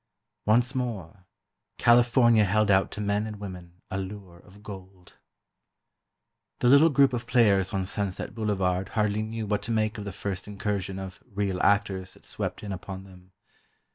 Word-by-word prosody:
Once 120 +4 +3
more, 105 -7 -5 0.5
California 120 -1 +5
held 105 +1 +2
out 95 0 +3
to - - -8
men 105 +1 0
and 110 - -6
women 90 -3 -10
a 95 - -2
lure 95 -2 -8
of 100 +4 -18
gold. 95 -2 -11 1.4
The - - +1
little 140 +5 +7
group 140 -3 +4
of 120 -1 -3
players 105 -6 +3
on 95 -1 -1
Sunset 100 -1 -3
Boulevard 95 -4 -1
hardly 105 0 +1
knew 110 0 -4
what 105 -1 -1
to 115 - -4
make 110 0 0
of 105 - -6
the 100 - -4
first 95 -1 -5
incursion 100 -2 -3
of 95 -1 -8
"real 100 -2 -1
actors" 95 -2 +1
that - - -16
swept - - -4
in 105 - -5
upon 95 0 -6
them. 95 -1 -17
100 Hz, 165 wpm, -27 LUFS, 95-110 Hz, 1.4 s, little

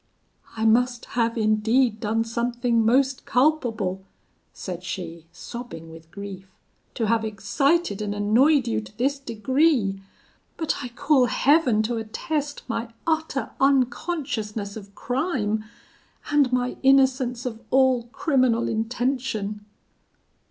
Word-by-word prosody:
'I 220 - 0
must 245 +2 +2
have 230 -1 +1
indeed 220 +2 +2
done 220 +2 0
something 235 0 0
most 260 +4 +2
culpable,' 235 -9 +1 0.5
said 180 -2 -7
she, 170 -2 -6
sobbing 175 -4 -9
with 165 0 -13
grief, 195 0 -8 0.5
'to 230 - 0
have 225 +1 +1
excited 220 - 0
and 205 -1 -2
annoyed 245 +7 +3
you 230 - 0
to 210 -1 -14
this 275 +3 0
degree; 240 -3 +1 0.6
but, 320 -3 -1
I 250 - -4
call 255 +2 +2
Heaven 255 -3 +3
to 235 +2 -2
attest 285 +6 -3
my 230 -1 -3
utter 320 -4 -1
unconsciousness 255 - 0
of 200 -2 -11
crime, 245 - -1 0.7
and 285 -3 +3
my 250 0 0
innocence 265 -2 +3
of 230 -2 -5
all 260 -2 +3
criminal 255 -3 +1
intention!' 225 -2 -2
235 Hz, 115 wpm, -24 LUFS, 215-265 Hz, 0.7 s, annoyed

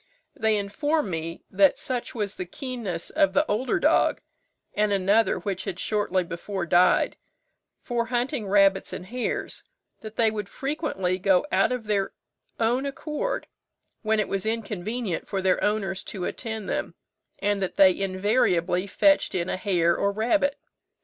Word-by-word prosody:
They 220 -1 +2
informed 290 +6 -1
me, 165 +1 -4
that 195 -1 +4
such 250 -1 -4
was 205 -3 -2
the 185 - -5
keenness 225 -7 -4
of 300 -1 +3
the 290 +2 +3
older 250 - 0
dog, - - +3 0.5
and 210 0 +1
another 200 +3 +3
which 195 -3 -4
had 180 - -4
shortly 200 -2 0
before 175 +2 -4
died, 175 +2 +3 0.7
for 240 -2 -1
hunting 245 -1 -1
rabbits 195 -1 +3
and 180 - -6
hares, 245 +5 -3 0.4
that 215 0 -9
they 225 -2 +3
would 210 -2 -5
frequently 270 - -2
go 190 +2 +3
out - - +3
of 250 -2 -2
their 205 -2 -1 0.5
own 245 +4 +1
accord, 305 - -3 0.6
when 220 -1 +1
it 210 - +1
was 195 -1 -2
inconvenient 220 -2 -3
for 195 - -2
their 190 -1 +1
owners 195 -3 0
to 185 -4 -5
attend 220 -4 -4
them, - - -3 0.4
and 205 0 0
that 190 - -2
they 190 -2 +6
invariably 185 -2 +1
fetched 290 +6 +3
in 175 0 -1
a - - 0
hare 175 -3 +2
or 200 - +1
rabbit. 245 +7 +1
205 Hz, 155 wpm, -26 LUFS, 190-235 Hz, 0.7 s, they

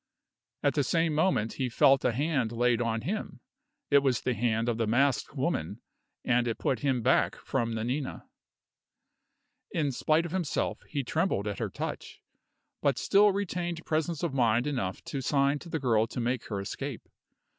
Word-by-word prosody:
At 140 -2 +3
the 145 - +1
same 165 +3 +1
moment 150 - +1
he 130 -2 -2
felt 135 +3 +4
a 125 - +3
hand 135 -2 0
laid 120 0 +2
on 115 -1 -1
him. 205 - -4 0.5
It 140 - +7
was 135 -3 +1
the 125 - 0
hand 115 0 0
of 115 -1 -1
the 115 - +1
masked 135 +4 +1
woman, 120 - -2 0.5
and 120 -1 +2
it 115 - -1
put 130 - 0
him 130 -3 0
back - - +3
from 115 -1 -2
Nanina. 125 +5 -3 1.4
In 150 -4 0
spite 155 +6 +1
of 170 - -6
himself, 180 -4 -1
he 140 -2 -2
trembled 155 - 0
at 100 -2 -3
her - - -2
touch, - - -6 0.6
but 140 -4 +2
still 205 +1 +4
retained 175 -4 -3
presence 160 0 -1
of 165 -5 -1
mind 120 -2 +2
enough 125 -11 -2
to 140 - -4
sign 140 +2 +2
to 170 - -11
the 160 - -1
girl 115 -4 +2
to 125 - -6
make 120 +1 -1
her 100 -3 -3
escape. 100 - -5
130 Hz, 175 wpm, -29 LUFS, 115-155 Hz, 1.4 s, It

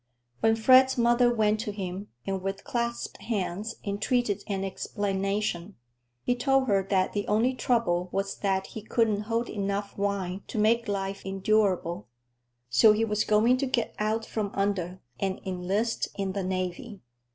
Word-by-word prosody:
When 225 0 +3
Fred's 260 +4 +6
mother 240 +1 +4
went 215 -2 +2
to 210 - -3
him 195 0 -5 0.2
and 195 -1 -2
with 195 +1 -4
clasped 235 0 -3
hands 210 0 -3
entreated 205 +1 0
an 195 -2 -2
explanation, 195 -1 -2 0.5
he 245 - +2
told 270 +1 +2
her 200 -3 +3
that 190 -2 +2
the 205 -1 -2
only 225 +5 +2
trouble 230 -8 +1
was 195 0 -2
that 190 -1 0
he 220 - -5
couldn't 215 -1 +1
hold 230 +1 0
enough 200 0 -3
wine 200 -2 -1
to - - -6
make 230 +3 +3
life 195 -1 -3
endurable, 195 -2 0 0.6
so 125 - +6
he 220 +1 +1
was 210 -1 0
going 225 +4 +4
to 275 +1 -1
get 245 -2 -1
out 220 +1 0
from 215 -2 -2
under 190 -2 -1 0.2
and 190 -1 -1
enlist 190 +5 -1
in 195 -1 -2
the 195 0 -3
navy. 185 +4 -3
205 Hz, 155 wpm, -28 LUFS, 195-225 Hz, 0.6 s, Fred's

